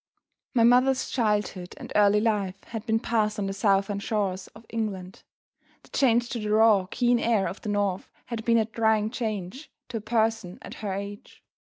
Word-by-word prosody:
My 230 - +5
mother's 255 +2 +4
childhood 210 -6 -1
and - - -9
early 210 0 +5
life 205 -3 -1
had 225 0 -7
been 225 0 +2
passed 215 -2 0
on 205 - -1
the 195 - -2
southern 200 0 +1
shores 200 -3 -2
of 220 +1 -14
England. 195 -5 -4 0.6
The - - -20
change 240 -3 +2
to 235 - -3
the 210 -1 -4
raw, 215 -3 +4
keen 245 +1 +2
air 225 -5 +1
of 195 - -7
the 210 - -5
North 200 -2 -1 0.2
had 230 -2 -5
been 230 0 +3
a 220 - +3
trying 220 -1 +1
change 220 - -4 0.2
to 235 - -3
a - - -5
person 220 -4 0
at - - -8
her 205 -2 -3
age. 200 +1 -7
215 Hz, 185 wpm, -26 LUFS, 200-230 Hz, 0.6 s, My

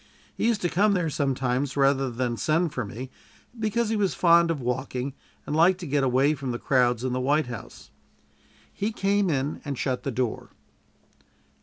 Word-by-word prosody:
He - - 0
used 230 -3 +1
to - - +3
come 200 +5 +3
there 170 -5 0
sometimes 135 -1 -1
rather 135 -1 +3
than 120 0 -2
send 155 +5 0
for 125 - -2
me, 125 +5 -7 0.5
because 220 +1 0
he 225 - 0
was 200 -3 0
fond 170 -1 +5
of 165 -3 -1
walking 130 +1 -3 0.3
and 150 - -3
liked 175 +3 +4
to - - -5
get 145 -2 0
away 135 +3 +3
from 135 -3 -5
the 120 - -2
crowds 125 -3 +2
in 130 -1 -1
the 130 - -1
White 145 +4 +2
House. 120 -4 -9 0.8
He 210 +3 -2
came 200 -2 +1
in 140 -1 -1
and 140 -3 -4
shut 130 0 -1
the 140 - -3
door. 125 -2 -2
140 Hz, 185 wpm, -26 LUFS, 130-170 Hz, 0.8 s, fond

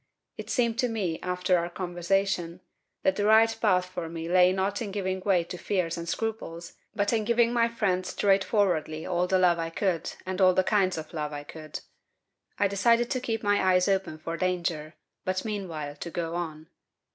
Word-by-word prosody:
It - - -8
seemed 235 -2 +1
to 250 - +2
me, 190 -8 -2
after 180 0 +1
our 170 +1 -3
conversation, 175 0 -1 0.4
that 190 - +2
the 205 - +1
right 225 +1 +5
path 185 -4 +3
for 175 -2 -6
me 165 0 -5
lay 180 +1 +5
not 195 +3 -1
in 220 - -3
giving 190 -1 -2
way 185 -2 +2
to 175 +1 -8
fears 180 -5 -1
and 170 0 -5
scruples, 170 -6 -4 0.2
but 205 +1 +1
in 220 -2 +1
giving 235 +1 +2
my 235 -1 +3
friend 200 -6 0
straightforwardly 190 -5 +1
all 180 0 0
the 190 - +3
love 175 -2 +3
I 165 0 -2
could 170 -1 -1
and 185 +1 -3
all 185 -1 +6
the 185 - +4
kinds 190 -3 +2
of 155 +1 -7
love 150 -2 -3
I 145 0 -5
could. 155 0 -8 0.8
I 200 - +3
decided 230 +4 +2
to 255 - 0
keep 225 -3 -2
my 205 0 +2
eyes 185 -1 +3
open 190 -5 0
for 165 +1 -5
danger, 170 -4 -2 0.3
but 185 +2 -2
meanwhile 170 -9 -4
to 170 - -6
go 165 -1 -3
on. 160 -3 -4
185 Hz, 190 wpm, -27 LUFS, 170-205 Hz, 0.8 s, all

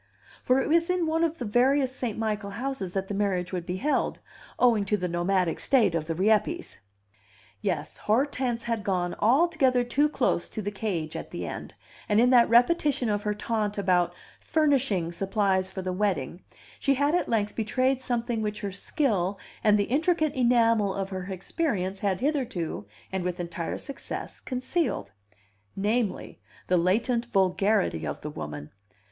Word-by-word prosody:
For 255 +1 +3
it - - 0
was 335 +3 +3
in 360 -2 +1
one 325 +1 +1
of 330 0 0
the 245 - -4
various 260 +4 +2
St. 240 -5 -3
Michael 215 -2 -2
houses 205 -4 -4
that 195 0 -2
the 205 - -4
marriage 195 -3 -1
would 175 -2 -3
be 180 +1 -2
held, 290 +9 0 0.4
owing 235 -4 +4
to 210 +2 +1
the 180 -2 -2
nomadic 175 0 0
state 230 -10 +3
of 160 -2 -2
the 165 - -2
Rieppes. 215 - +1 0.8
Yes, - - -2
Hortense 245 0 0
had 230 -3 -2
gone 180 -3 0
altogether 260 0 +3
too 280 +5 +2
close 250 - 0
to 215 - -5
the 205 - -2
cage 180 -7 -3
at - - -6
the - - -5
end, - - -7 0.3
and, 210 0 +4
in 250 +2 +5
that 240 -2 +6
repetition 250 +1 +3
of 205 -1 0
her 210 -1 -1
taunt 210 -1 -2
about 180 -3 +2 0.2
"furnishing" 270 - +1
supplies 190 0 0
for 190 0 -6
the 185 0 -2
wedding, 180 -4 -1 0.4
she 275 - +2
had 285 +3 +2
at 355 - +1
length 210 -2 0
betrayed 255 +4 +1
something 240 -2 -1
which 210 0 -3
her 200 -2 -3
skill 200 - 0 0.3
and 210 -1 +5
the 205 - +2
intricate 310 - +1
enamel 230 -5 +3
of 195 -1 -3
her 185 -1 -4
experience 195 - -2
had 195 -1 -1
hitherto, 245 - -2 0.2
and 190 -1 -2
with 180 0 -3
entire 170 -1 -4
success, 275 -2 -6
concealed 255 - -2 0.6
namely, 210 +1 -1 0.3
the 180 - +2
latent 230 +7 +1
vulgarity 195 - +1
of 70 - -5
the 150 - -5
woman. 75 - -7
210 Hz, 165 wpm, -27 LUFS, 190-255 Hz, 0.8 s, that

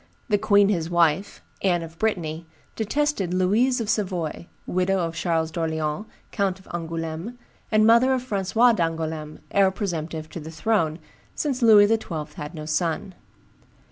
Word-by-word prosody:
The 205 -2 +3
queen 205 -1 +4
his 170 -5 0
wife, 170 +2 +1 0.2
Anne 175 -3 +1
of 165 0 -11
Brittany, 170 -7 -2 0.3
detested 220 - 0
Louise 220 +8 +2
of 225 - -3
Savoy, 180 -6 -2 0.2
widow 185 +2 +1
of 165 -3 -1
Charles 165 -1 -1
d'Orleans, 160 +2 -2 0.2
Count 195 -2 0
of 190 - -19
Angouleme, 165 +6 -4 0.3
and 215 0 +4
mother 235 +4 +5
of 260 -1 0
Francis 195 -6 -3 0.2
d'Angouleme, 160 -3 -3
heir 195 -1 +4
presumptive 165 -5 -4
to - - -6
the 155 0 -8
throne, 160 -1 0 0.4
since 275 -4 -2
Louis 215 -3 +8
XII. 165 -9 -2
had 150 +3 -7
no 155 -1 -6
son. 165 +4 -1
180 Hz, 145 wpm, -24 LUFS, 160-210 Hz, 0.4 s, Louis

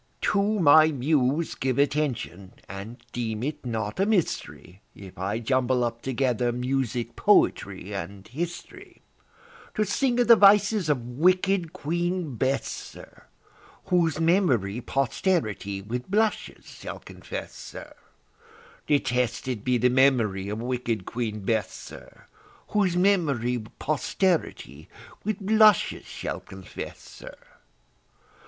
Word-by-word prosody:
To 205 +1 +1
my 155 -1 +7
Muse 145 +1 +1
give 130 -2 -2
attention, 130 -10 -1
and 110 +6 -9
deem 115 -2 -3
it 150 +2 -4
not 110 - -3
a 195 - +3
mystery 90 - -2
If 95 -2 -12
I 100 +3 -1
jumble 125 +1 +1
up 115 0 -3
together 125 -2 0
music, 125 -1 -2
poetry, - - +2
and 95 +4 -6
history, 170 +7 -7 0.7
To 215 - +1
sing 245 +4 0
of 245 - +3
the 235 - +9
vices 205 -3 +5
of 130 -5 0
wicked 180 +6 +2
Queen 170 0 -2
Bess, 135 +4 0
sir, - - -10 0.6
Whose 170 -4 +2
memory 135 - +2
posterity 125 - -1
with 120 - -5
blushes 215 +2 0
shall - - -8
confess, - - -8
sir, - - -10 0.9
Detested 125 -4 0
be 125 -1 +2
the 125 +2 +3
memory 120 -7 +2
of 105 +1 -4
wicked 120 -4 -2
Queen 110 -3 -4
Bess, 105 -1 0
sir, - - -12 0.4
Whose 190 -4 +1
memory 140 - +1
posterity 155 - -1 0.3
with 215 0 -2
blushes 215 -1 +4
shall - - -5
confess, 95 -1 -9
sir. - - -12
130 Hz, 115 wpm, -26 LUFS, 115-175 Hz, 0.9 s, the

